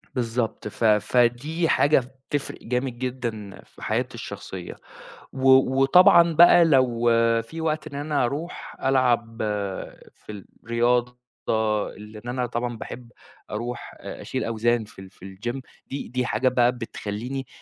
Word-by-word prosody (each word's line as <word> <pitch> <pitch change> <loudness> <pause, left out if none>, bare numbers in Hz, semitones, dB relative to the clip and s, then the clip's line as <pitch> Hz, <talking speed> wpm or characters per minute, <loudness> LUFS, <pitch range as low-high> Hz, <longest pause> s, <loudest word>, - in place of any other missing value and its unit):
بالضبط، 115 -3 -2
ف 105 - -6
فدي 120 - +2
حاجة 145 +1 +4 0.3
بتفرِق 145 -1 -2
جامد 125 +1 -2
جدًا 120 -6 -5
في - - -20
حياتي - - -2
الشخصية، 90 -2 -7 0.6
و 135 0 +1 0.3
وطبعًا 170 +3 +6
بقى 175 +1 +7
لو 125 -6 +3 0.3
فيه 160 +8 -8
وقت 155 -1 -1
إن 140 - -9
أنا 145 -2 0
أرُوح 150 +7 -5
ألعب 120 -4 +1 0.8
في 105 -2 -10 0.2
الرياضة، 120 +1 +1 0.8
لإن 105 +1 -11
أنا 125 0 -1
طبعًا 120 0 -3
باحب 120 +2 -9 0.4
أرُوح 120 +3 -5
أ - - -8
أشيل - - -3
أوزان 115 +1 0
في 105 -2 -15
ال 95 0 -11
في 95 - -21
الجيم، 115 +7 -5 0.3
دي 140 - -5
دي 125 0 -2
حاجة 120 +3 +1
بقى 125 -1 +3
بتخلِّيني 120 +2 -5
125 Hz, 135 wpm, -24 LUFS, 115-135 Hz, 0.8 s, بقى